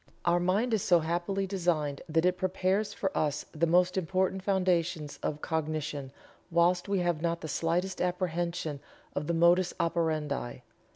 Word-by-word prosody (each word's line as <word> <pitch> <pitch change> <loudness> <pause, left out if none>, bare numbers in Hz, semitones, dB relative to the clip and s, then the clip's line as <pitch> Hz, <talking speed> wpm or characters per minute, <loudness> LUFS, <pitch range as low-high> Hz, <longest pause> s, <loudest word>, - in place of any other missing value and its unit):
Our 175 0 +4
mind 200 +7 +1
is 215 - +2
so 175 -2 +4
happily 175 +5 -1
designed 170 -7 -1
that 160 +2 +2
it 180 0 +3
prepares 185 +3 0
for 195 -1 -3
us 150 -1 0
the 165 +2 +1
most 180 +2 +3
important 190 +2 0
foundations 175 -6 0
of 150 0 -3
cognition, 155 -4 -2 0.4
whilst 175 +2 +2
we 200 - +2
have 175 -3 0
not 170 0 -1
the 160 - -5
slightest 175 +5 -1
apprehension 175 -4 -1 0.4
of 145 +1 -2
the 170 - 0
modus 175 +2 +4
operandi. 155 -7 -1
175 Hz, 155 wpm, -30 LUFS, 160-185 Hz, 0.4 s, Our